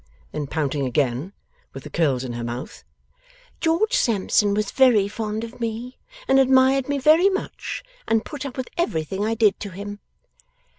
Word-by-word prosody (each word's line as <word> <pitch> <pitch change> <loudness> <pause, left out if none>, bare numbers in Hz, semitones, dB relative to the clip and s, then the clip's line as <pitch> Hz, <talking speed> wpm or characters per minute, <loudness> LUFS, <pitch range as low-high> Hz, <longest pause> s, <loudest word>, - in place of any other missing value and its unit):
Then, 150 -2 -4
pouting 140 -2 -1
again, 130 +5 0 0.4
with 135 - -8
the - - -10
curls 140 -7 +1
in 125 -2 -5
her 120 0 -4
mouth; 120 +2 -6 0.8
'George 345 +8 +1
Sampson 210 - +2
was 210 -1 -1
very 240 -7 +4
fond 215 +1 -4
of 230 +2 -9
me, 230 +2 -4 0.3
and 270 - +5
admired 265 0 +4
me 285 - +1
very 315 +8 +5
much, 380 -1 -4 0.2
and 225 0 +1
put 295 -3 -6
up 275 -2 -7
with 260 - -4
everything 190 - -1
I 225 +1 0
did 215 -3 +3
to 205 - -5
him. 205 +2 -7
215 Hz, 165 wpm, -23 LUFS, 160-265 Hz, 0.8 s, and